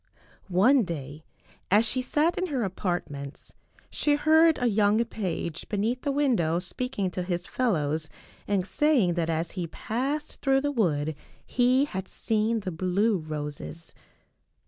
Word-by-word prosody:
One 210 +9 +4
day, 155 - -5 0.5
as 210 +4 +5
she 255 +3 0
sat 305 +6 +1
in 370 - -1
her 270 -7 -1
apartments, 175 -7 -4 0.4
she 295 -1 +2
heard 315 +2 +5
a 245 - 0
young 215 0 +3
page 175 -7 -4
beneath 220 +5 -1
the 285 - -1
window 240 - +2
speaking 200 +1 -2
to 180 - -3
his 175 -1 -2
fel 250 -4 0
lows 155 0 -1 0.4
and 195 -3 +1
saying 255 - +2
that 165 -1 -1
as 165 +1 -1
he 180 -4 -4
passed 270 - -3
through 270 -1 +3
the 290 +1 0
wood 160 - 0 0.3
he 255 +2 +3
had 190 -8 -5
seen 220 +1 0
the 190 -2 -4
blue 185 +5 +1
roses. 155 +1 -6
205 Hz, 145 wpm, -27 LUFS, 170-255 Hz, 0.5 s, as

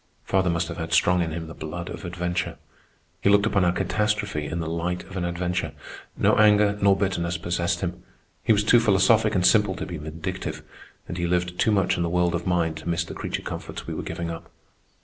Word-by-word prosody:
Father 95 -1 +1
must 85 -1 0
have - - -6
had 80 0 -4
strong 90 +1 +4
in 85 - -1
him 80 +1 -4
the 80 - -9
blood 85 +3 -6
of - - -7
adventure. 90 0 -3 0.6
He - - +3
looked 100 0 +5
upon 100 -3 +2
our 90 - +4
catastrophe 105 -4 -1
in 85 - -3
the 80 - -3
light 85 +2 -2
of 95 - -12
an 95 - -2
adventure. 85 +1 -2 0.4
No - - +3
anger 105 -1 +5
nor 100 -1 +5
bitterness 90 -3 -1
possessed 85 0 -1
him. 90 -1 -3 0.4
He - - +2
was 105 -1 +4
too 120 +3 +6
philosophic 110 0 +4
and 90 -1 +2
simple 105 -3 +4
to - - -4
be 85 - -6
vindictive, 80 +2 -5 0.4
and 85 - -5
he 85 - 0
lived 90 0 -1
too - - +3
much 95 -3 +2
in - - -1
the 85 - 0
world 90 0 +1
of 90 +1 -2
mind 85 -3 +1
to 80 - -6
miss 85 0 +1
the - - -8
creature - - -4
comforts - - -6
we - - -5
were - - -4
giving 85 0 -4
up. 85 - -8
90 Hz, 225 wpm, -25 LUFS, 85-95 Hz, 0.6 s, too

